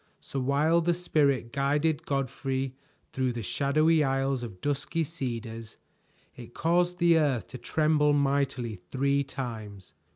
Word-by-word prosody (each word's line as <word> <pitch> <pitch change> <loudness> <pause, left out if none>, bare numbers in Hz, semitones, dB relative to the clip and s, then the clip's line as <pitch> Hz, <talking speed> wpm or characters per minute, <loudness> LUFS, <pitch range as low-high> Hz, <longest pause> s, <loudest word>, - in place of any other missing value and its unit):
So 135 - -5
while 145 +6 +2
the 170 +1 +1
Spirit 140 -8 +1
guided 145 +3 0
Godfrey 135 -1 -2 0.4
through 130 -2 0
the 120 -1 -5
shadowy 155 - +2
aisles 135 -1 0
of 105 -7 -8
dusky 145 - -1
cedars, 115 -7 -6 0.6
it 120 -1 -12
caused 175 +2 +1
the 170 -2 +4
earth 140 -6 +1
to 130 - -8
tremble 150 +2 +2
mightily 135 -5 0
three 140 +1 +1
times. 110 -8 -7
140 Hz, 130 wpm, -28 LUFS, 125-155 Hz, 0.6 s, the